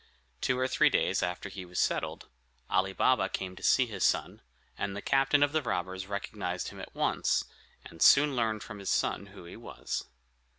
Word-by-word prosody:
Two 130 Hz, -, +1 dB
or 130 Hz, 0 st, +1 dB
three 130 Hz, -, +4 dB
days -, -, +1 dB
after 90 Hz, +3 st, -3 dB
he 95 Hz, -1 st, -8 dB
was 90 Hz, 0 st, -9 dB
settled, -, -, -1 dB, 0.4 s
Ali 95 Hz, +1 st, +2 dB
Baba 95 Hz, 0 st, +2 dB
came 95 Hz, -1 st, -4 dB
to -, -, -13 dB
see 130 Hz, -, +4 dB
his 110 Hz, -4 st, -4 dB
son, -, -, +1 dB, 0.3 s
and 100 Hz, -1 st, -3 dB
the -, -, -3 dB
captain 135 Hz, +1 st, +3 dB
of 145 Hz, -, +2 dB
the 155 Hz, 0 st, +1 dB
robbers 95 Hz, -5 st, -3 dB
recognized 100 Hz, -2 st, -4 dB
him -, -, -11 dB
at -, -, -10 dB
once, -, -, +1 dB, 0.4 s
and 80 Hz, -, -12 dB
soon 140 Hz, 0 st, +6 dB
learned 110 Hz, -3 st, 0 dB
from 105 Hz, -2 st, -9 dB
his 100 Hz, -, -4 dB
son 100 Hz, -, 0 dB
who 95 Hz, -3 st, -13 dB
he 85 Hz, -, -10 dB
was. 115 Hz, -, -5 dB
100 Hz, 195 wpm, -30 LUFS, 95-130 Hz, 0.4 s, soon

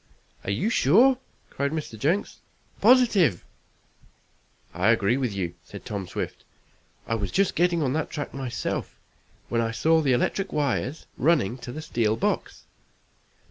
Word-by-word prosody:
"Are -, -, -5 dB
you 120 Hz, -, 0 dB
sure?" 240 Hz, -, +5 dB, 0.3 s
cried 140 Hz, +1 st, -1 dB
Mr. 155 Hz, -7 st, -4 dB
Jenks. 155 Hz, -, -1 dB, 0.4 s
"Positive." 215 Hz, -, +4 dB, 1.3 s
"I 90 Hz, +4 st, +2 dB
agree 115 Hz, 0 st, +3 dB
with 130 Hz, -4 st, -1 dB
you," 90 Hz, -4 st, -3 dB
said -, -, -11 dB
Tom 100 Hz, -3 st, -4 dB
Swift. -, -, -5 dB, 0.6 s
"I -, -, -2 dB
was 105 Hz, -4 st, -2 dB
just 195 Hz, -1 st, +1 dB
getting 175 Hz, -2 st, +2 dB
on 130 Hz, -2 st, 0 dB
that 155 Hz, 0 st, -1 dB
track 145 Hz, -2 st, -5 dB
myself, 135 Hz, -3 st, -4 dB, 0.5 s
when 115 Hz, -1 st, 0 dB
I 115 Hz, -, 0 dB
saw 160 Hz, +8 st, +2 dB
the 135 Hz, -4 st, +2 dB
electric 195 Hz, +10 st, 0 dB
wires 145 Hz, 0 st, -1 dB
running 140 Hz, -, +2 dB
to 120 Hz, -, -7 dB
the 155 Hz, +4 st, -7 dB
steel 110 Hz, -6 st, 0 dB
box. -, -, -2 dB
135 Hz, 145 wpm, -25 LUFS, 115-165 Hz, 1.3 s, sure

